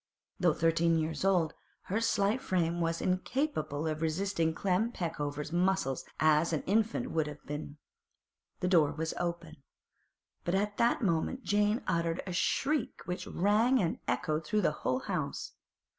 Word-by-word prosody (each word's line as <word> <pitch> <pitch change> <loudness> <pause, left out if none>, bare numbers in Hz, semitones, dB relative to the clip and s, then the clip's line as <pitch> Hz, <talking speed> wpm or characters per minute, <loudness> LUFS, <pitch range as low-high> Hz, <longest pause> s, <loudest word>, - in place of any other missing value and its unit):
Though 175 -4 +3
thirteen 165 0 +3
years 160 +2 -2
old, 180 -5 +2 0.3
her 210 +4 -1
slight 215 +2 +2
frame 175 -5 0
was 165 0 -1
as - - 0
incapable 185 - -1
of 155 0 -2
resisting 165 0 0
Clem 195 +7 0
Peckover's 150 - -3
muscles 175 -6 +1
as 155 +1 +4
an 155 - -1
infant's 225 +5 +1
would 160 -2 0
have 150 0 -9
been. 150 0 -6 0.8
The 180 - +1
door 160 -5 +4
was 160 +1 -3
open, 170 -2 -3 0.9
but 175 - 0
at 205 +1 0
that 235 +1 +2
moment 190 +8 0
Jane 210 +3 +2
uttered 170 0 0
a 185 - -4
shriek 275 - 0
which 180 +1 -4
rang 220 +7 +3
and 170 -6 0
echoed 155 +1 0
through 210 +7 0
the 175 - +3
whole 130 +1 0
house. - - -3
175 Hz, 155 wpm, -31 LUFS, 160-205 Hz, 0.9 s, as